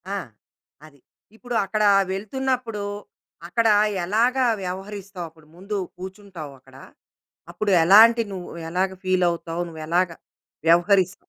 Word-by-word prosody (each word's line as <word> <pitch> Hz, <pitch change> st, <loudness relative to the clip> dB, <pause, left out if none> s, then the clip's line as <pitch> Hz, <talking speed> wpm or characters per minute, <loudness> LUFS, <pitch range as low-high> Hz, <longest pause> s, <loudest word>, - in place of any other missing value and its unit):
ఆ! -, -, -1 dB, 0.7 s
అది. 145 Hz, -2 st, -18 dB, 0.4 s
ఇప్పుడు 245 Hz, +1 st, -6 dB
అక్కడ 215 Hz, +2 st, -1 dB, 0.3 s
వెళ్తున్నప్పుడు 230 Hz, +2 st, -2 dB, 0.6 s
అక్కడ 230 Hz, +5 st, +1 dB, 0.4 s
ఎలాగా 240 Hz, +7 st, +2 dB, 0.2 s
వ్యవహరిస్తావు? 190 Hz, 0 st, -6 dB
అప్పుడు 160 Hz, -1 st, -22 dB
ముందు 200 Hz, +4 st, -5 dB, 0.2 s
కూర్చుంటావక్కడ, 175 Hz, -9 st, -10 dB, 0.8 s
అప్పుడు 215 Hz, -1 st, -1 dB
ఎలాంటి 225 Hz, +6 st, +7 dB
నువ్వు 185 Hz, -2 st, -7 dB, 0.2 s
ఎలాగా 185 Hz, +2 st, -1 dB
ఫీలవుతావు? 175 Hz, -2 st, 0 dB
నువ్వు 160 Hz, -1 st, -9 dB
ఎలాగా 170 Hz, 0 st, +1 dB, 0.5 s
వ్యవహరిస్ 185 Hz, +2 st, +4 dB
190 Hz, 100 wpm, -23 LUFS, 175-215 Hz, 0.8 s, ఎలాంటి